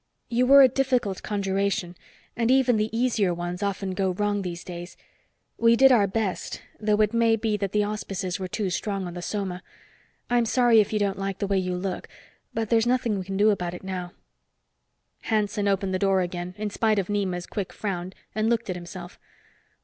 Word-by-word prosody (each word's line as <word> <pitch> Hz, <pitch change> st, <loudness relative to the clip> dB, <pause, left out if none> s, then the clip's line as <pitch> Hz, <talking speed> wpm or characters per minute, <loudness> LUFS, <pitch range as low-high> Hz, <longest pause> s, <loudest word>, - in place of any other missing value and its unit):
You 245 Hz, +1 st, +2 dB
were 275 Hz, +1 st, +9 dB
a -, -, +8 dB
difficult 250 Hz, -6 st, 0 dB
conjuration 195 Hz, -3 st, -1 dB, 0.4 s
and 230 Hz, 0 st, 0 dB
even 255 Hz, -3 st, +4 dB
the 215 Hz, +1 st, 0 dB
easier 225 Hz, -6 st, +1 dB
ones 175 Hz, +2 st, -4 dB
often 200 Hz, -1 st, -2 dB
go 190 Hz, 0 st, 0 dB
wrong 205 Hz, +1 st, 0 dB
these 175 Hz, -2 st, -5 dB
days. 175 Hz, 0 st, -8 dB, 0.6 s
We 230 Hz, 0 st, +5 dB
did 270 Hz, +2 st, +6 dB
our 215 Hz, -5 st, +5 dB
best, 195 Hz, -1 st, -2 dB, 0.2 s
though 210 Hz, 0 st, +2 dB
it 210 Hz, +1 st, +2 dB
may 230 Hz, -1 st, +4 dB
be 220 Hz, -1 st, -1 dB
that 200 Hz, -2 st, -2 dB
the 210 Hz, 0 st, +2 dB
auspices 195 Hz, -3 st, -3 dB
were 185 Hz, -, -3 dB
too 190 Hz, 0 st, -2 dB
strong 195 Hz, 0 st, -2 dB
on 175 Hz, -, -6 dB
the 175 Hz, -, -6 dB
soma. 185 Hz, -2 st, -3 dB, 0.7 s
I'm 240 Hz, -1 st, +2 dB
sorry 235 Hz, -1 st, +5 dB
if 205 Hz, -, -3 dB
you 215 Hz, -, +1 dB
don't 200 Hz, -1 st, 0 dB
like 195 Hz, -1 st, -3 dB
the -, -, -2 dB
way 195 Hz, -1 st, +1 dB
you 185 Hz, -1 st, -2 dB
look. 185 Hz, 0 st, -4 dB, 0.4 s
But 225 Hz, -2 st, -3 dB
there's 230 Hz, 0 st, +3 dB
nothing 245 Hz, -5 st, +1 dB
we 185 Hz, -, -5 dB
can 195 Hz, +1 st, -4 dB
do 210 Hz, +2 st, +5 dB
about 180 Hz, -3 st, -2 dB
it -, -, -10 dB
now." 185 Hz, -2 st, -5 dB, 1.1 s
Hanson 210 Hz, -2 st, 0 dB
opened 195 Hz, -1 st, 0 dB
the 185 Hz, -, 0 dB
door 195 Hz, -1 st, +3 dB
again, 175 Hz, 0 st, -4 dB
in 210 Hz, 0 st, -3 dB
spite 215 Hz, 0 st, +1 dB
of 195 Hz, -2 st, 0 dB
Nema's 190 Hz, -4 st, -1 dB
quick 200 Hz, -3 st, -4 dB
frown, 185 Hz, -3 st, -4 dB, 0.2 s
and 215 Hz, +1 st, +1 dB
looked 235 Hz, -4 st, 0 dB
at -, -, -3 dB
himself. 175 Hz, +1 st, -9 dB
200 Hz, 200 wpm, -25 LUFS, 185-220 Hz, 1.1 s, were